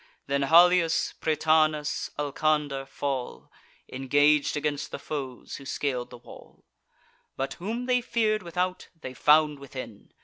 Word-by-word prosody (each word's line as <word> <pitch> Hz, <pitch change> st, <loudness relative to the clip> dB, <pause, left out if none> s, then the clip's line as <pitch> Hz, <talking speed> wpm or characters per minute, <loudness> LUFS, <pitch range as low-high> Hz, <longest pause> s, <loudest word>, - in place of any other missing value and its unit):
Then 140 Hz, 0 st, -1 dB
Halius, 170 Hz, +3 st, +4 dB
Prytanis, 155 Hz, -1 st, +1 dB
Alcander 145 Hz, -1 st, -1 dB
fall— 135 Hz, -2 st, -4 dB, 0.4 s
Engag'd 145 Hz, +3 st, +2 dB
against 145 Hz, -1 st, -2 dB
the -, -, -6 dB
foes 135 Hz, -5 st, -6 dB
who 140 Hz, -, -11 dB
scal'd 130 Hz, -2 st, -3 dB
the -, -, -11 dB
wall: 120 Hz, -, -16 dB, 0.7 s
But, 135 Hz, +1 st, -2 dB
whom 230 Hz, +6 st, -3 dB
they 250 Hz, -1 st, +2 dB
fear'd 220 Hz, -3 st, 0 dB
without, 180 Hz, +1 st, -3 dB
they 130 Hz, -5 st, -7 dB
found 150 Hz, +2 st, +4 dB
within. 130 Hz, -6 st, -9 dB
150 Hz, 125 wpm, -27 LUFS, 135-165 Hz, 0.7 s, Halius